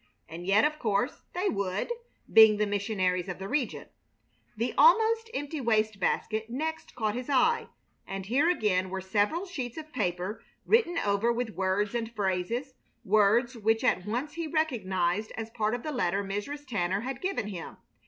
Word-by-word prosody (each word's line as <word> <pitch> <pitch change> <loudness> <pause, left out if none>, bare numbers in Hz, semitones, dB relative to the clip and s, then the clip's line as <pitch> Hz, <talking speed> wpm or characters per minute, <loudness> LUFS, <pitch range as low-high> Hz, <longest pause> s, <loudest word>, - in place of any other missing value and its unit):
And 170 +3 -8
yet, 205 +3 +5
of 305 0 -1
course, 220 +5 0
they 365 +3 0
would, 200 - -1 0.4
being 220 -1 +8
the 210 - +2
missionaries 195 -3 0
of 180 - -4
the 195 - -6
region. 265 +2 -2 0.7
The 235 +3 -1
almost 455 -1 +5
empty 290 - -4
waste 215 -3 +1
basket 220 +4 -1
next 315 +6 -4
caught 215 -3 0
his 250 +3 -5
eye, 285 - +3 0.4
and 195 -1 -5
here 275 - +2
again 195 - +1
were 190 +1 -3
several 205 - 0
sheets 265 -10 -5
of 310 -1 -8
paper 185 -2 -2 0.2
written 430 -7 +3
over 205 -1 +2
with 235 -1 -2
words 195 +2 0
and 230 -1 -2
phrases, 210 +7 -1 0.3
words 215 +5 +3
which 225 +1 +1
at 190 -6 +1
once 250 +8 -2
he 335 -1 -3
recognized 215 - 0
as 225 0 -5
part 220 0 0
of 245 - -7
the 305 - -3
letter 200 -7 0
Mrs. 205 +10 -5
Tanner 195 -5 -1
had 260 +1 -5
given 370 - -2
him. 180 -5 -7
220 Hz, 170 wpm, -29 LUFS, 195-275 Hz, 0.7 s, being